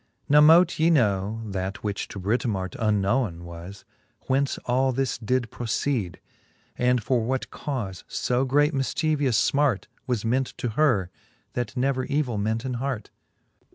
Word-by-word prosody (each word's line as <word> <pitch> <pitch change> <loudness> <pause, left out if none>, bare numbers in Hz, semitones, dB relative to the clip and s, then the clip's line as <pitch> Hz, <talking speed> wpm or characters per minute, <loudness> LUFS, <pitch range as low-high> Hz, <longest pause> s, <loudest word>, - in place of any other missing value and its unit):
Now 150 +1 +6
mote 165 +3 +6
ye 160 +2 +4
know 110 - +1
(that 95 -1 -4
which 105 -1 -3
to 100 - -8
Britomart 100 -2 -1
Unknowen 105 -3 0
was) 85 +3 -10 0.4
whence 135 +1 0
all 130 +2 +2
this 130 -2 -1
did 120 0 -1
proceede, 115 -4 -2 0.6
And 125 -1 +2
for 125 +1 +1
what 130 +3 -2
caufe 110 -10 -4
fb 125 +2 0
great 145 +3 +3
mifchievous 140 -2 +1
finart 140 -9 +2 0.2
Was 120 -4 -1
ment 130 +3 0
to 120 - -2
her, 110 - +2 0.4
that 120 0 -3
never 130 0 +1
evill 140 -7 -1
ment 110 +4 -1
in 130 - -2
hart. 135 -5 -3
125 Hz, 145 wpm, -25 LUFS, 105-135 Hz, 0.6 s, Now